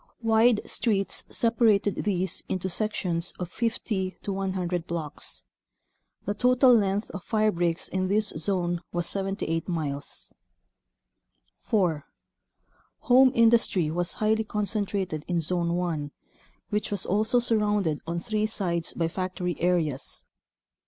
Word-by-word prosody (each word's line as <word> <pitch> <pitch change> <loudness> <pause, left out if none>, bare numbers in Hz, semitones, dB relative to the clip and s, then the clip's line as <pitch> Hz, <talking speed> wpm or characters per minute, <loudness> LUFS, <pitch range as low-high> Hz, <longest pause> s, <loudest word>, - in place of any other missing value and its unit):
Wide 225 0 +3
streets 200 -5 0
separated 225 -4 +3
these 190 -3 -1
into 185 0 -2
sec 215 +4 -1
tions 170 -2 -1
of 180 -1 -5
50 215 -5 -2
to 200 - -2
100 185 -3 -2
blocks. 160 -4 -1 0.8
The 205 - -1
total 250 +3 +5
length 200 -1 0
of 185 - -7
firebreaks 180 -7 0
in 185 0 -1
this 210 +2 +1
zone 175 0 -1
was 175 -1 -1
78 190 -3 -2
miles. 145 -5 -4 1.3
4. 175 -9 +1 0.9
Home 260 0 +6
industry 225 -8 +4
was 175 +1 +1
highly 220 +1 +1
concentrated 200 -6 -2
in 175 -2 0
Zone 170 +1 0
1 165 -5 -2 0.6
which 210 0 0
was 200 -3 0
also 215 +5 +2
surrounded 210 -9 +1
on 170 +1 -2
three 215 +4 -1
sides 175 -6 -2
by 165 - 0
factory 180 0 -3
areas. 165 -6 0
190 Hz, 120 wpm, -27 LUFS, 170-215 Hz, 1.3 s, Home